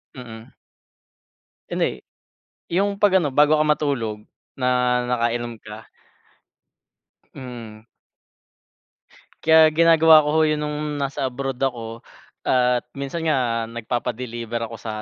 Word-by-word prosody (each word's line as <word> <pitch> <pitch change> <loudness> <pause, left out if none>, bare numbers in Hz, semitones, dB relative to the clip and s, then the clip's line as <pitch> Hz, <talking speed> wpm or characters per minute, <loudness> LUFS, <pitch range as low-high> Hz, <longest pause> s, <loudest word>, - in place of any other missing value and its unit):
Mm. 115 -3 -11 1.2
Ano, - - -1
eh - - -5 0.7
'yung 200 +3 0
pag-ano, 190 -8 +3
bago 150 +3 +4
ka 155 - +2
matulog, 140 -8 -1 0.4
na 125 -1 0 0.4
nakainom 120 -1 -1
ka. 110 0 -12 1.5
Hmm. 115 -4 -9 1.6
Kaya 160 -1 +6
ginagawa 160 -1 +6
ko, 150 - -2
ho, - - +4
'yon 155 -1 0
no'ng 150 -1 -3
nasa 140 0 -2
abroad 135 0 -4
ako 115 -3 -4 0.4
at 125 -1 +2
minsan 140 +4 -5
nga 125 -7 0
nagpapa-deliver 120 0 -4
ako 115 - -8
sa 110 -1 -6
130 Hz, 110 wpm, -22 LUFS, 115-150 Hz, 1.6 s, Kaya